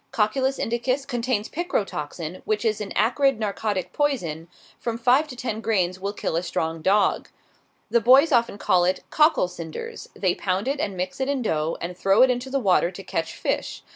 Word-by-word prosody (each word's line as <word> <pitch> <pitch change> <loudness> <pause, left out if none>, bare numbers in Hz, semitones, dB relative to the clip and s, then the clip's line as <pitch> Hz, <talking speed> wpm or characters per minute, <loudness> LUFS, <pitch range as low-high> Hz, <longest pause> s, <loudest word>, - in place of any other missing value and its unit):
Cocculus 260 +5 +1
indicus 255 +4 -1
contains 240 -4 -1
picrotoxin, 185 - -3
which 215 +2 -1
is 215 -1 +1
an 200 - -5
"acrid 250 +4 +2
narcotic 205 -2 -2
poison;" 175 - -1 0.3
from 230 -1 -3
five 250 +6 +3
to 260 - -9
ten 225 -3 -4
grains 185 -5 0
will 200 +1 -2
kill 205 - -3
a 165 - +1
strong 165 -2 -3
dog. 200 +4 +2 0.6
The 235 - +4
boys 270 +7 +6
often 235 -5 +2
call 180 -3 +3
it 185 +1 0
"cockle 305 - +4
cinders;" 180 - -8
they 185 -3 +1
pound 190 +4 -2
it 280 +1 -1
and 200 -8 -2
mix 185 +5 -4
it 265 - 0
in 275 -3 0
dough, 160 -5 -1
and 175 +1 -5
throw 195 +6 +4
it 260 - +5
into 250 +1 -3
the 275 - 0
water 185 -6 +3
to 190 +2 -10
catch 165 -3 -3
fish. - - -3
215 Hz, 190 wpm, -24 LUFS, 185-255 Hz, 0.6 s, boys